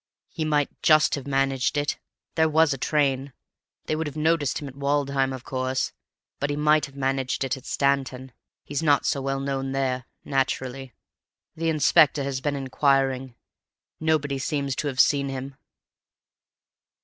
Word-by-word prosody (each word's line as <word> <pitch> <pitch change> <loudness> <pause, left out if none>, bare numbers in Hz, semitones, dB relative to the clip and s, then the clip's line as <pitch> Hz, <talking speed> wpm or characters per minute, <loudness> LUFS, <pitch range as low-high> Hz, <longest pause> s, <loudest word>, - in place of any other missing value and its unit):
"He 160 - -3
might 150 -2 +1
just 155 -1 +5
have 140 -1 -3
managed 135 0 +1
it. 145 0 -1 0.3
There 160 -1 +3
was 160 -1 +4
a - - -5
train. 140 -2 0 0.5
They 155 - -1
would 160 0 -2
have 150 - -7
noticed 155 -2 +1
him 145 - -6
at 135 - -10
Woodham, 140 -1 0
of 130 -1 -6
course, 130 0 -2 0.5
but 140 - -1
he 145 - -1
might 150 +1 +3
have 140 - -17
managed 135 -1 -1
it 135 -1 -1
at 135 - -12
Stanton. 135 -2 0 0.3
He's 145 +2 -3
not 145 -3 +3
so 140 - 0
well 135 0 -1
known 135 -1 -2
there, 130 -2 -1 0.2
naturally. 135 -2 -2 0.6
The 165 +1 -1
inspector 150 -2 +4
has 135 -1 -3
been 145 +1 -1
inquiring. 135 -1 +1 0.6
Nobody 150 -3 0
seems 140 -2 -2
to 150 - -1
have 130 -2 -4
seen 140 -1 +4
him." 135 0 -6
140 Hz, 160 wpm, -25 LUFS, 135-145 Hz, 0.6 s, just